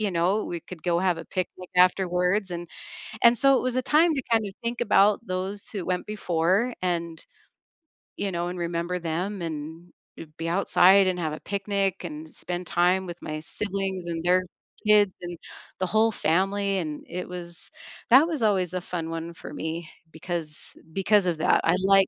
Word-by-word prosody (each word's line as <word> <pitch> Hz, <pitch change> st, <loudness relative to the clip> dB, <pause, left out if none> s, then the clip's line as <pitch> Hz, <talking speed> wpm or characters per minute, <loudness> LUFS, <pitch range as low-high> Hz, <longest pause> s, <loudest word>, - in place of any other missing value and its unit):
you 210 Hz, -2 st, 0 dB
know, 180 Hz, +5 st, +1 dB
we 170 Hz, -1 st, -4 dB
could 175 Hz, -1 st, -11 dB
go 170 Hz, -1 st, +1 dB
have 180 Hz, -1 st, +1 dB
a -, -, -7 dB
picnic 185 Hz, -1 st, -5 dB
afterwards, 180 Hz, +1 st, +3 dB
and 175 Hz, -1 st, -5 dB, 0.6 s
and 235 Hz, 0 st, +7 dB
so, 275 Hz, +1 st, +6 dB
it -, -, -1 dB
was 255 Hz, -1 st, -1 dB
a 255 Hz, -, +2 dB
time 310 Hz, +5 st, +4 dB
to 270 Hz, -, -1 dB
kind 225 Hz, -1 st, +3 dB
of 195 Hz, -, -8 dB
think 235 Hz, +1 st, -2 dB
about 205 Hz, -2 st, +4 dB
those 190 Hz, +3 st, -3 dB
who 195 Hz, -5 st, -4 dB
went 180 Hz, -1 st, -1 dB
before 195 Hz, +3 st, 0 dB
and, 170 Hz, -2 st, -2 dB, 0.9 s
you 200 Hz, -1 st, -2 dB
know, 175 Hz, 0 st, -2 dB
and 180 Hz, -, -6 dB
remember 170 Hz, +1 st, -2 dB
them 175 Hz, +4 st, -3 dB
and, 165 Hz, +1 st, -6 dB, 0.2 s
eh -, -, -8 dB
be 165 Hz, 0 st, -3 dB
outside 190 Hz, +1 st, +5 dB
and 185 Hz, -1 st, 0 dB
have 160 Hz, -3 st, -1 dB
a 155 Hz, -, -6 dB
picnic 195 Hz, -1 st, -1 dB
and 155 Hz, -2 st, -7 dB
spend 175 Hz, 0 st, -5 dB
time 180 Hz, +2 st, +2 dB
with 175 Hz, -1 st, -6 dB
my 155 Hz, 0 st, -5 dB
siblings 190 Hz, +1 st, -3 dB
and 165 Hz, -1 st, -3 dB
their 180 Hz, +1 st, +3 dB, 0.4 s
kids 210 Hz, -2 st, +5 dB
and 175 Hz, -1 st, -6 dB, 0.4 s
the 185 Hz, -, +1 dB
whole 220 Hz, +4 st, +3 dB
family, 195 Hz, +2 st, +1 dB
and 155 Hz, -4 st, -5 dB
it 180 Hz, +1 st, -5 dB
was 175 Hz, -1 st, -5 dB, 0.4 s
that 270 Hz, +7 st, +7 dB
was 310 Hz, -7 st, -3 dB
always 190 Hz, -5 st, +2 dB
a 185 Hz, -, -2 dB
fun 170 Hz, -2 st, -4 dB
one 165 Hz, +1 st, -5 dB
for -, -, -10 dB
me 160 Hz, +1 st, -5 dB, 0.2 s
because 160 Hz, -2 st, -3 dB, 0.2 s
because 195 Hz, +1 st, +3 dB
of 175 Hz, -3 st, 0 dB
that, 155 Hz, -, +3 dB
I'd 180 Hz, +3 st, +2 dB
like 195 Hz, -1 st, +6 dB
180 Hz, 190 wpm, -26 LUFS, 170-200 Hz, 0.9 s, and